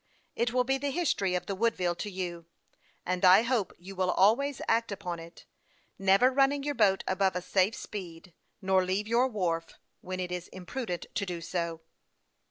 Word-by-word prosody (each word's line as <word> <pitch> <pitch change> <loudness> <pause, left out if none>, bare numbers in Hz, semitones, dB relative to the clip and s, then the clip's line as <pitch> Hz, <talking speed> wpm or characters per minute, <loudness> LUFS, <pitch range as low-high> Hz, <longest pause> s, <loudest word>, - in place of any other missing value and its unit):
It 235 0 0
will 250 +1 +2
be 270 +2 0
the 285 +1 -1
history 265 - 0
of 180 - -2
the 200 - -3
Woodville 190 -4 +1
to 205 +4 -5
you, 175 -3 -5 0.6
and 180 +1 -2
I 185 +4 +8
hope 235 -5 0
you 190 +3 -10
will 185 -1 0
always 240 +10 +3
act 230 -1 +1
upon 180 -4 -4
it, 165 +1 -13 0.5
never 195 +7 +5
running 275 +1 +2
your 290 0 -1
boat 200 -6 +3
above 190 0 +1
a 180 - -1
safe 190 +4 +2
speed, 180 -4 -8
and - - -31 0.3
never 190 -1 +4
leaving 195 +4 -2
your 245 +3 +4
wharf 170 -8 -2 0.2
when 185 0 -5
it 180 -1 -3
is 180 0 -4
imprudent 185 0 -5
to 205 - -1
do 175 -2 -4
so." 170 -1 -3
190 Hz, 185 wpm, -29 LUFS, 180-230 Hz, 0.6 s, I